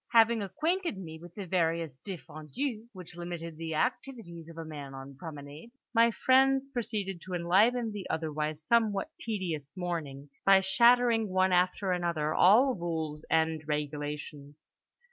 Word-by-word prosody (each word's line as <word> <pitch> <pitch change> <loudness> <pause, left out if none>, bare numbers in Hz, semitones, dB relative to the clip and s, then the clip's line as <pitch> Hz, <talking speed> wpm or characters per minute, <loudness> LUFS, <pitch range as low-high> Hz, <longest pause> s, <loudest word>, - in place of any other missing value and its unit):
Having 230 -1 +5
acquainted 325 - -1
me 160 -4 -8
with 175 +1 -13
the 200 - -5
various 165 -5 -1
défendus 195 - -5
which 180 -4 -11
limited 170 -2 -6
the 160 -1 -4
activities 190 - -3
of 165 - -12
a 165 - -5
man 145 -3 -8
on 135 +1 -9
promenade, 150 - -9 0.2
my 230 0 +5
friends 265 +3 +3
proceeded 210 -8 -3
to 185 0 -5
enliven 215 +7 +3
the 205 -3 -7
otherwise 155 -1 -2
somewhat 220 -3 +2
tedious 170 -10 -4
morning 155 -6 -4 0.2
by 195 0 +7
shattering 235 +3 +4
one 185 0 +2
after 180 +2 +2
another 170 -4 0
all 245 +8 +6
rules 160 -5 -4
and 160 -1 +2
regulations. 150 0 -5
175 Hz, 140 wpm, -30 LUFS, 155-220 Hz, 0.2 s, by